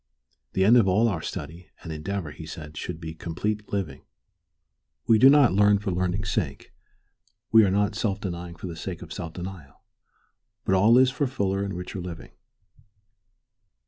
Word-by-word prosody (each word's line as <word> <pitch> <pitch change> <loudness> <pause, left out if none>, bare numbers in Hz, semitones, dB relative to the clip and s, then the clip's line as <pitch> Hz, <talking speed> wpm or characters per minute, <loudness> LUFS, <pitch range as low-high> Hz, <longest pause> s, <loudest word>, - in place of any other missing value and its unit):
The 95 - +2
end 115 +4 +7
of 110 -5 +4
all 105 +5 +3
our 90 -7 -1
study 85 +5 -7 0.2
and 80 - -6
endeavor, 85 +1 -4
he 80 +1 -10
said, 80 -3 -9
should 80 +1 -5
be 80 -1 -6
complete 105 +6 -4
living. 85 -10 -3 1.0
We 110 -2 +5
do 130 - +8
not 140 -7 +6
learn 105 +1 +5
for 100 -1 -3
learning's 90 +3 -1
sake, 75 -12 -3 0.8
we 110 0 +8
are - - +2
not 100 +1 +1
self 100 -2 -1
denying 85 -3 -5
for 85 - -9
the 85 -2 -5
sake 90 +2 -6
of 80 - -9
self 80 -2 -6
denial, 90 -6 -9 0.8
but - - +1
all 105 +6 +5
is 130 0 +5
for 140 +1 -1
fuller 100 -6 -1
and 100 -2 -4
richer 90 +1 -6
living. 85 -2 -8
95 Hz, 175 wpm, -26 LUFS, 85-105 Hz, 1.0 s, do